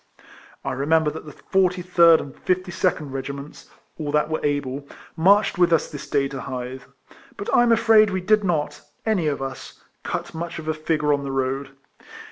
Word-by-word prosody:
I -, -, -1 dB
remember 150 Hz, +3 st, +2 dB
that 155 Hz, -, -9 dB
the -, -, -8 dB
43 180 Hz, +1 st, +1 dB
rd 165 Hz, -1 st, +8 dB
and 135 Hz, -, -9 dB
52nd 180 Hz, -5 st, -1 dB
Kegiments 140 Hz, +2 st, -7 dB, 0.3 s
(all 150 Hz, -2 st, -3 dB
that 150 Hz, +1 st, +1 dB
were 155 Hz, -, -2 dB
able) 145 Hz, -1 st, -2 dB, 0.3 s
marched 195 Hz, +3 st, +3 dB
with 175 Hz, -1 st, +4 dB
us 165 Hz, -, +2 dB
this 145 Hz, -, -8 dB
day 140 Hz, -2 st, +1 dB
to 135 Hz, -1 st, -6 dB
Hythe; 130 Hz, +1 st, -6 dB, 0.6 s
but 200 Hz, -, -4 dB
I'm 240 Hz, -1 st, +5 dB
afraid 225 Hz, -2 st, +5 dB
we 190 Hz, -1 st, -2 dB
did 210 Hz, +3 st, +3 dB
not 165 Hz, -6 st, -1 dB, 0.2 s
(any 205 Hz, -8 st, +1 dB
of 140 Hz, -2 st, -1 dB
us) 135 Hz, -1 st, -8 dB, 0.2 s
cut -, -, -4 dB
much 170 Hz, +1 st, -5 dB
of 155 Hz, -1 st, -8 dB
a 155 Hz, -, +1 dB
figure 155 Hz, -1 st, 0 dB
on 140 Hz, -, 0 dB
the 140 Hz, -, -4 dB
road. 135 Hz, +1 st, -2 dB
155 Hz, 180 wpm, -23 LUFS, 140-180 Hz, 0.6 s, rd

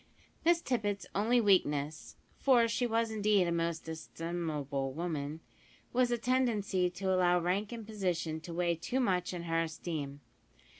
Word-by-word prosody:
Miss 340 Hz, 0 st, +4 dB
Tippet's 205 Hz, -5 st, -1 dB
only 230 Hz, +5 st, +3 dB
weakness 155 Hz, -8 st, +1 dB, 0.2 s
for 245 Hz, -4 st, +5 dB
she 235 Hz, +2 st, 0 dB
was 225 Hz, 0 st, +1 dB
indeed 210 Hz, -3 st, +3 dB
a -, -, 0 dB
most 165 Hz, -1 st, -1 dB
estimable 160 Hz, -4 st, -3 dB
woman 155 Hz, -1 st, -3 dB, 0.5 s
was 250 Hz, 0 st, +3 dB
a 240 Hz, -, +1 dB
tendency 220 Hz, -7 st, +1 dB
to 190 Hz, +1 st, -1 dB
allow 180 Hz, -1 st, +4 dB
rank 190 Hz, +5 st, 0 dB
and 230 Hz, -2 st, -6 dB
position 180 Hz, -7 st, -2 dB
to 165 Hz, +2 st, -9 dB
weigh 170 Hz, 0 st, +1 dB
too 175 Hz, +10 st, -2 dB
much 185 Hz, -7 st, +1 dB
in 175 Hz, -2 st, -5 dB
her 165 Hz, -1 st, +1 dB
esteem. 155 Hz, -3 st, -4 dB
180 Hz, 150 wpm, -32 LUFS, 165-220 Hz, 0.5 s, for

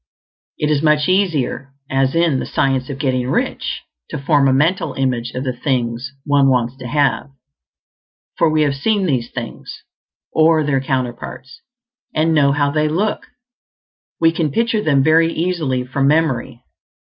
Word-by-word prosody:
It 150 Hz, 0 st, 0 dB
is 145 Hz, -2 st, +1 dB
much 150 Hz, -1 st, +2 dB
easier, 165 Hz, -8 st, 0 dB
as 135 Hz, +1 st, 0 dB
in 165 Hz, -5 st, +2 dB
"The -, -, -4 dB
Science 135 Hz, -1 st, 0 dB
of 140 Hz, -, -5 dB
Getting 130 Hz, -3 st, -1 dB
Rich," -, -, -2 dB, 0.3 s
to -, -, -4 dB
form 140 Hz, 0 st, +2 dB
a -, -, +3 dB
mental 160 Hz, +8 st, +1 dB
image 125 Hz, -3 st, -1 dB
of 130 Hz, -, -3 dB
the 130 Hz, -2 st, -2 dB
things 125 Hz, -1 st, -2 dB
one 140 Hz, -1 st, +3 dB
wants 125 Hz, -1 st, +1 dB
to 130 Hz, -2 st, -8 dB
have; 140 Hz, +1 st, 0 dB, 1.1 s
for 165 Hz, -, +3 dB
we 155 Hz, 0 st, +2 dB
have 145 Hz, -2 st, +1 dB
seen 200 Hz, +8 st, 0 dB
these 125 Hz, -8 st, -1 dB
things, 120 Hz, -3 st, -8 dB, 0.5 s
or 160 Hz, 0 st, +4 dB
their 140 Hz, -2 st, 0 dB
counterparts, 130 Hz, 0 st, -4 dB, 0.5 s
and 160 Hz, +1 st, +2 dB
know 140 Hz, -3 st, +4 dB
how 145 Hz, 0 st, +1 dB
they 155 Hz, 0 st, +1 dB
look; 200 Hz, +7 st, -1 dB, 0.9 s
we 165 Hz, 0 st, +4 dB
can 165 Hz, -2 st, -1 dB
picture 230 Hz, +6 st, 0 dB
them 140 Hz, -7 st, +2 dB
very 165 Hz, +2 st, +4 dB
easily 160 Hz, -8 st, -1 dB
from 135 Hz, +2 st, -1 dB
memory. 140 Hz, -6 st, 0 dB
140 Hz, 160 wpm, -18 LUFS, 130-160 Hz, 1.1 s, or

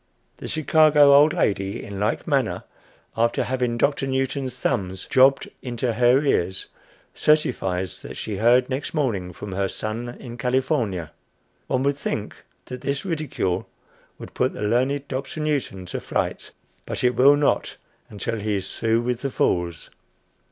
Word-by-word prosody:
The -, -, -7 dB
Chicago 155 Hz, -2 st, +5 dB
old 145 Hz, +2 st, +7 dB
lady 100 Hz, -, -1 dB
in 100 Hz, -1 st, -7 dB
like 105 Hz, +3 st, -1 dB
manner, 135 Hz, -7 st, 0 dB, 0.5 s
after 115 Hz, +1 st, +1 dB
having 125 Hz, -2 st, -1 dB
had 120 Hz, -, -4 dB
Doctor 140 Hz, -1 st, +1 dB
Newton's 135 Hz, 0 st, -2 dB
thumbs 95 Hz, -7 st, -2 dB
"jobbed" 135 Hz, 0 st, +4 dB
into 120 Hz, -1 st, -2 dB
her 125 Hz, +4 st, +4 dB
ears, 95 Hz, -9 st, 0 dB, 0.5 s
certifies 95 Hz, -12 st, 0 dB
that -, -, -8 dB
she 105 Hz, -3 st, -4 dB
heard 120 Hz, +4 st, +4 dB
next 135 Hz, +4 st, -4 dB
morning 105 Hz, -12 st, -1 dB
from 95 Hz, +3 st, -8 dB
her 95 Hz, +1 st, 0 dB
son 115 Hz, +5 st, -4 dB
in 120 Hz, -1 st, -9 dB
California. 120 Hz, -, 0 dB, 0.6 s
One 130 Hz, 0 st, 0 dB
would 140 Hz, 0 st, +1 dB
think -, -, -3 dB, 0.3 s
that 125 Hz, -1 st, -8 dB
this 140 Hz, +3 st, -2 dB
ridicule 125 Hz, -, -2 dB, 0.5 s
would -, -, -10 dB
put -, -, 0 dB
the -, -, -5 dB
learned 130 Hz, +6 st, +1 dB
Dr. 135 Hz, +3 st, -5 dB
Newton 140 Hz, -11 st, -2 dB
to -, -, -5 dB
flight; -, -, -2 dB, 0.4 s
but -, -, -4 dB
it 125 Hz, 0 st, +3 dB
will 140 Hz, +3 st, +6 dB
not 145 Hz, 0 st, 0 dB, 0.3 s
until 110 Hz, +2 st, -4 dB
he 105 Hz, 0 st, -1 dB
is 95 Hz, 0 st, -6 dB
through 115 Hz, 0 st, +2 dB
with 120 Hz, 0 st, -2 dB
the 140 Hz, -, -1 dB
fools. 85 Hz, -8 st, -1 dB
125 Hz, 155 wpm, -23 LUFS, 105-140 Hz, 0.6 s, old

